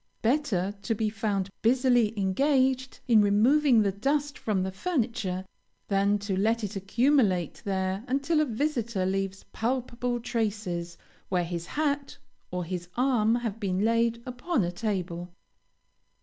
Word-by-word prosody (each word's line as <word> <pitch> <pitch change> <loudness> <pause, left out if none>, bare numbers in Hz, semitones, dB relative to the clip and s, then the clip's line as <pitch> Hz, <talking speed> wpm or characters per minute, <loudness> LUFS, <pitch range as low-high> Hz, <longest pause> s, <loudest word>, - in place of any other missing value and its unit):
Better 225 -7 +1
to 225 - -1
be 215 0 -1
found 200 -3 -1
busily 245 -2 +3
engaged 260 +6 +1
in 225 -3 +6
removing 230 +4 +4
the 200 - +1
dust 285 +8 -1
from 200 -4 -1
the 190 - -2
furniture, 220 - -2 0.4
than 200 +1 +2
to 200 -1 -3
let 225 +4 +1
it 205 0 -4
accumulate 195 - +1
there 190 0 -1
until 280 +5 +1
a - - +2
visitor 235 -6 -1
leaves 195 0 -2
palpable 245 0 -1
traces 205 -7 -2 0.3
where 180 -2 +1
his 170 -1 -5
hat 290 -2 -1 0.3
or 180 0 -3
his 175 0 -5
arm 240 -4 +3
have 230 -3 -3
been 195 -1 0
laid 230 0 +1
upon 250 - -1
a 175 - -1
table. 180 -3 -3
220 Hz, 135 wpm, -28 LUFS, 190-250 Hz, 0.4 s, in